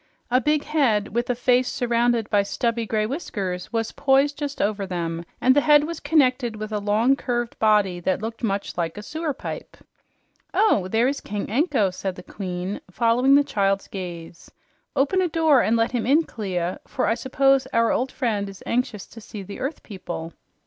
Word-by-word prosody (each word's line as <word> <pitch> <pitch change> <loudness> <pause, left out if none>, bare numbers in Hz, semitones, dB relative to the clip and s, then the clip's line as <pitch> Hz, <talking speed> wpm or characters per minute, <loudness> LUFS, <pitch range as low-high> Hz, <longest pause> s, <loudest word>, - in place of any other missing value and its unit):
A 255 +1 +4
big 300 0 +1
head 250 -10 +1
with 240 +3 -2
a 245 - +1
face 250 +1 +2
surrounded 235 -2 +1
by 205 -2 +4
stubby 230 +3 -1
gray 215 -1 0
whiskers 200 - -4
was 225 -1 -1
poised 280 +1 +2
just 285 -1 -5
over 200 -1 0
them, 170 -2 -3 0.2
and 260 +1 +4
the 290 - +5
head 295 -1 +5
was 330 +1 -4
connected 260 -6 +2
with 215 0 -6
a 210 - -1
long, 215 +6 +3
curved 240 -3 -3
body 210 -5 +3
that 185 +1 0
looked 225 +2 -6
much 200 -2 -2
like 165 +2 -2
a 210 - -6
sewer 315 +6 -3
pipe. 275 - -7 0.8
"Oh, 220 - +3
there 225 +5 +2
is 280 +1 -2
King 205 0 -4
Anko," 255 - +2
said 185 0 -4
the 180 - -10
Queen, 185 0 -5
following 240 +7 +3
the 285 - +5
child's 195 -6 0
gaze. 175 -3 -8 0.5
"Open 370 +8 +2
a 365 - +2
door 315 -5 +4
and 230 +1 +2
let 230 0 +1
him 240 -2 -1
in, 300 +5 +4
Clia, 185 - -3
for 255 - -1
I - - +2
suppose 270 +2 +2
our 230 0 +2
old 255 +2 0
friend 210 -5 -1
is 195 -1 -12
anxious 240 -4 -1
to 225 - -13
see 210 -1 -8
the 200 +2 -9
earth 275 +5 -4
people." 175 -5 -7
230 Hz, 190 wpm, -23 LUFS, 200-270 Hz, 0.8 s, the